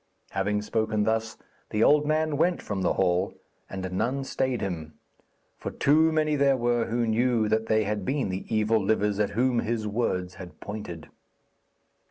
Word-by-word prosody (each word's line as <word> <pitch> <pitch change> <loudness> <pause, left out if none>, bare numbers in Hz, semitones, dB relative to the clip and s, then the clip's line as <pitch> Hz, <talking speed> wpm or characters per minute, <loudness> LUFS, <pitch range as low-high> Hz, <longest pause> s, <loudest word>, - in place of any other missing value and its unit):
Having 105 +2 -1
spoken 110 -1 0
thus, 110 +1 -1 0.3
the 105 +1 +1
old 150 0 +4
man 155 0 +1
went 170 +4 +2
from 100 -2 -4
the 90 - +2
hall, 90 0 +1 0.3
and 95 -1 -5
none 130 +9 -1
stayed 130 -2 -1
him; 80 -5 -5 0.6
for - - -4
too 160 +3 +3
many 155 -1 +1
there 140 -1 +3
were 120 -1 +1
who 120 +1 0
knew 115 0 +2
that 110 +1 0
they 110 0 +3
had 105 -1 -2
been 135 -1 -1
the 95 +1 -4
evil 110 -1 +2
livers 105 0 +1
at 105 - +2
whom 125 -1 +2
his 115 -1 -2
words 95 -5 -1
had 90 -1 -11
pointed. 100 -6 -7
110 Hz, 170 wpm, -27 LUFS, 100-130 Hz, 0.6 s, old